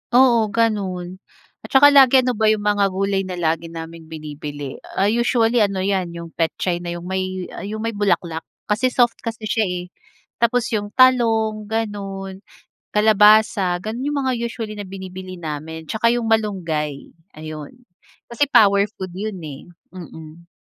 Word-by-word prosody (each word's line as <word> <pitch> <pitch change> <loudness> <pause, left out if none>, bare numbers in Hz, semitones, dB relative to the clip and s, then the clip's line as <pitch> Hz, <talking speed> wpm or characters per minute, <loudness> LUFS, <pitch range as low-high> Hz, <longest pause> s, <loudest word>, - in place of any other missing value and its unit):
Oo 240 -4 +5
gano'n. 195 -5 -1 0.4
At - - -11
tsaka 285 +2 +7
lagi 265 -2 +7
ano 250 - +1
ba 220 -1 +1
'yong 215 -1 +2
mga 205 -1 +2
gulay 195 0 -1
na 185 - -4
lagi 165 -1 -1
naming 165 0 -9
binibili, 145 -3 -7 0.2
ah, 195 - +1
usually 235 +1 +2
ano 200 -3 +1
'yan 185 -3 -1
'yong 170 -1 -8
petchay 170 +2 -1
na 175 0 -5
'yong 175 - -8
may 185 0 -3 0.2
'yong 215 +1 -5
may 230 - -1
bulaklak 180 -6 -1 0.3
kasi 220 +5 +2
soft 245 -2 +2
kasi 230 -1 -6
siya 215 -1 0
eh. 180 0 -4 0.5
Tapos 235 +1 +2
'yong 205 -2 -3
talong, 225 -4 +3
gano'n, 195 -3 -4 0.6
kalabasa 210 -3 +5
gano'n 230 +4 -4
'yong 295 -1 -1
mga 260 -1 +1
usually 230 -2 -4
na 200 - -6
binibili 185 -1 -8
namin 160 0 -6
tsaka 220 +1 +1
'yong 240 0 0
malunggay. 170 -10 -1 0.2
Ayun, 155 -1 -8 0.6
kasi 285 +5 +1
power 200 -6 +5
food 185 -1 -6
'yon 210 +1 -4
eh. 145 +2 -9 0.2
Mmm. 165 -2 -11
200 Hz, 155 wpm, -21 LUFS, 175-225 Hz, 0.6 s, tsaka